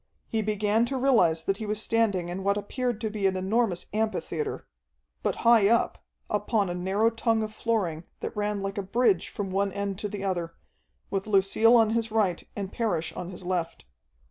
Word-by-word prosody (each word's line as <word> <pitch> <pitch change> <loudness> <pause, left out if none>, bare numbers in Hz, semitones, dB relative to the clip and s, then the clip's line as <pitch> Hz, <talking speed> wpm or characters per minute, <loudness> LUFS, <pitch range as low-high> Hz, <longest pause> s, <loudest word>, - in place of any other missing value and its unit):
He 225 - -1
began 210 +1 +1
to 265 +2 -3
realize 200 -12 +3
that 195 +2 0
he 215 - -5
was 210 0 0
standing 215 -6 +1
in 185 +2 -4
what 200 +1 +2
appeared 240 +2 -2
to 220 -2 -2
be 205 -2 +1
an 190 - 0
enormous 190 -1 0
amphitheatre. 215 -7 -2 0.6
But - - 0
high 230 -4 +6
up, 235 +2 +1 0.2
upon 210 -2 0
a - - -2
narrow 195 +5 +1
tongue 225 -1 +1
of 215 0 -5
flooring 190 -9 -1
that - - -5
ran 210 -1 -1
like 195 +1 -3
a - - 0
bridge 195 -2 +1
from 195 -2 -4
one 200 +1 +1
end 200 0 -3
to 210 - -3
the 200 -1 -5
other, 175 -4 -2 0.6
with 195 +1 -2
Lucille 215 +3 +4
on 225 -2 +5
his 230 0 0
right 210 -5 +1
and 200 -2 -4
Parrish 210 -9 -1
on 175 - -6
his 185 0 -9
left. 175 - -2
205 Hz, 195 wpm, -27 LUFS, 190-225 Hz, 0.6 s, high